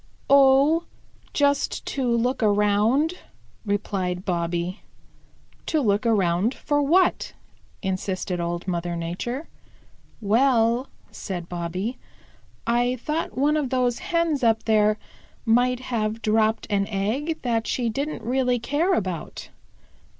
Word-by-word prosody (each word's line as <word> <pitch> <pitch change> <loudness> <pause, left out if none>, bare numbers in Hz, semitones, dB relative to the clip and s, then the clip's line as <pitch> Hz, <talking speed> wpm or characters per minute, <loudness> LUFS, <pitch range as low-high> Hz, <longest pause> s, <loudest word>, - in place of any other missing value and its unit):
"Oh, 280 +4 +5 0.5
just 285 -1 +1
to 265 -2 -2
look 235 +2 +1
around," 215 - +2 0.5
replied 190 -2 -2
Bobby. 175 +1 -2 0.9
"To 315 - +1
look 215 -3 +1
around 195 +1 +2
for 290 0 0
what?" 350 +6 +2 0.5
insisted 185 -1 -2
Old 170 +1 -3
Mother 175 -1 -2
Nature. 185 - -4 0.7
"Well," 235 +2 +2 0.2
said 175 -4 -6
Bobby, 180 +7 -4 0.7
"I 240 +2 +1
thought 300 +5 -3
one 290 +3 +3
of 295 -4 0
those 250 -2 +1
Hens 335 -5 0
up 225 -1 +3
there 215 -1 +3 0.5
might 245 +2 +2
have 225 -3 -2
dropped 220 +1 +2
an 200 -1 +1
egg 230 +11 -1
that 230 -3 0
she 245 -2 -1
didn't 280 +7 -3
really 250 +1 +1
care 300 +10 +1
about." 185 - -4
230 Hz, 115 wpm, -24 LUFS, 195-270 Hz, 0.9 s, Oh